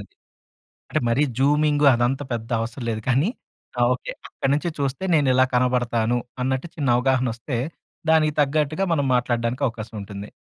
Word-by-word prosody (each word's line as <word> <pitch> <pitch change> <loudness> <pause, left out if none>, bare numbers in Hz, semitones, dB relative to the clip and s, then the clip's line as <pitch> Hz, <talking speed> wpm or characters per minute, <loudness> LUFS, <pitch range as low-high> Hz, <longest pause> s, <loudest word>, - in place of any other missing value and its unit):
అది. - - -12 0.8
అంటే, 155 - +1
మరి 115 +5 +2 0.2
జూమింగు 145 +1 +3
అదంతా 125 +4 0
పెద్ద 115 -1 -4
అవసరం 115 +2 -5
లేదు 110 -1 -3
కానీ, 135 +8 +3 0.5
ఆహ్, - - +4
ఓకే. - - -6 0.2
అక్కడి 135 - -2
నుంచి 150 +4 -1
చూస్తే 140 +4 -2
నేనిలా 130 -4 +4
కనబడతాను, 120 -2 +1 0.2
అన్నట్టు 130 +5 -1
చిన్న 145 -4 -1
అవగాహన 130 0 +2
వస్తే, 120 +2 -4 0.5
దానికి 155 -2 +3
తగ్గట్టుగా 150 +4 +1
మనం 145 -4 +1
మాట్లాడడానికి 125 +1 0
అవకాశం 115 0 -8
ఉంటుంది. 100 +1 -8
130 Hz, 150 wpm, -23 LUFS, 120-145 Hz, 0.8 s, ఆహ్